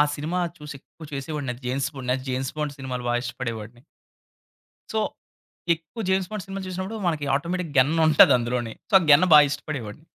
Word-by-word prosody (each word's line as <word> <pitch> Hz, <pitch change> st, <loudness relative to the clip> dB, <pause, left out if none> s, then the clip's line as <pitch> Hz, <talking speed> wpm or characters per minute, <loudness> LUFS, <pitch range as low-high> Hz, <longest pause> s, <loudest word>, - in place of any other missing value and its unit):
Cinema 160 Hz, +5 st, -2 dB, 0.2 s
చూసి 150 Hz, -1 st, -9 dB
ఎక్కువ 155 Hz, +3 st, -14 dB
చేసేవాడిని 140 Hz, -1 st, -4 dB
అది 125 Hz, -, -15 dB
జేమ్స్ 135 Hz, +2 st, -1 dB
బాండ్ 130 Hz, -2 st, -6 dB
నా -, -, +3 dB
జేమ్స్ 130 Hz, 0 st, -2 dB
బాండ్ 150 Hz, -2 st, -3 dB
సినిమాలు 130 Hz, -2 st, -5 dB
బాగా 120 Hz, 0 st, +1 dB
ఇష్టపడేవాడిని. 120 Hz, -2 st, -6 dB, 1.1 s
సో, 220 Hz, -, +1 dB, 0.7 s
ఎక్కువ 165 Hz, +7 st, -9 dB
జేమ్స్ 190 Hz, -1 st, +1 dB
బాండ్ 210 Hz, -3 st, -4 dB
సినిమాలు 195 Hz, 0 st, -6 dB
చూసినప్పుడు 185 Hz, +4 st, -4 dB
మనకి 155 Hz, -4 st, -1 dB
ఆటోమేటిక్ 170 Hz, +2 st, -3 dB
గెన్నుంటది 150 Hz, +1 st, +6 dB
అందులోని. 120 Hz, -1 st, -2 dB, 0.2 s
సో, -, -, -12 dB
ఆ -, -, -3 dB
గెన్న 145 Hz, +6 st, +7 dB
బాగా 150 Hz, -1 st, +9 dB
ఇష్టపడేవాడిని. 145 Hz, -3 st, -6 dB
145 Hz, 165 wpm, -24 LUFS, 125-165 Hz, 1.1 s, బాగా